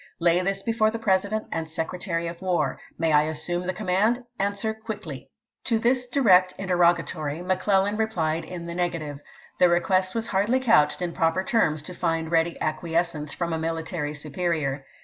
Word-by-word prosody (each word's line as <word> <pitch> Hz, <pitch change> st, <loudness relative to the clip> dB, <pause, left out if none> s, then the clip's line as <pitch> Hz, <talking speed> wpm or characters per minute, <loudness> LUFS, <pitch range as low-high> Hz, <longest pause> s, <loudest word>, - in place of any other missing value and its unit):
Lay 170 Hz, +1 st, +3 dB
this 195 Hz, +1 st, -1 dB
before 225 Hz, -1 st, +2 dB
the 225 Hz, -, -3 dB
President 205 Hz, 0 st, +1 dB
voi."vii., -, -, -5 dB
and 160 Hz, -1 st, -6 dB
Secretary 170 Hz, +1 st, -3 dB
of 170 Hz, +1 st, -6 dB
War. 185 Hz, -2 st, 0 dB, 0.2 s
May 165 Hz, -1 st, +1 dB
I 150 Hz, -, +6 dB
assume 175 Hz, +3 st, -3 dB
the -, -, +1 dB
com 215 Hz, +3 st, -7 dB
" -, -, -1 dB
64i'. -, -, +2 dB
mand? 220 Hz, +7 st, +2 dB, 0.2 s
Answer 200 Hz, +2 st, -1 dB
quickly." 215 Hz, -, -7 dB, 0.4 s
To 230 Hz, -, +2 dB
this 250 Hz, +2 st, +1 dB
direct 190 Hz, -8 st, +4 dB
interrogatory 170 Hz, -4 st, +1 dB
McClellan 190 Hz, +2 st, +1 dB
replied 170 Hz, -8 st, 0 dB
in 180 Hz, -2 st, -7 dB
the 170 Hz, 0 st, -6 dB
negative. 165 Hz, -5 st, -2 dB, 0.4 s
The 180 Hz, -, +6 dB
request 185 Hz, +2 st, +2 dB
was 225 Hz, -1 st, -1 dB
hardly 215 Hz, +5 st, +1 dB
couched 180 Hz, -, +3 dB
in 170 Hz, -1 st, -2 dB
proper 165 Hz, +4 st, +1 dB
terms 155 Hz, -9 st, +1 dB
to 180 Hz, -, -7 dB
fi.nd 165 Hz, -2 st, -1 dB
ready 165 Hz, 0 st, +1 dB
acquiescence 160 Hz, -1 st, -1 dB
from 170 Hz, -1 st, -2 dB
a 160 Hz, -, -1 dB
military 160 Hz, -2 st, -3 dB
superior. 150 Hz, -2 st, -2 dB
175 Hz, 180 wpm, -25 LUFS, 165-195 Hz, 0.4 s, I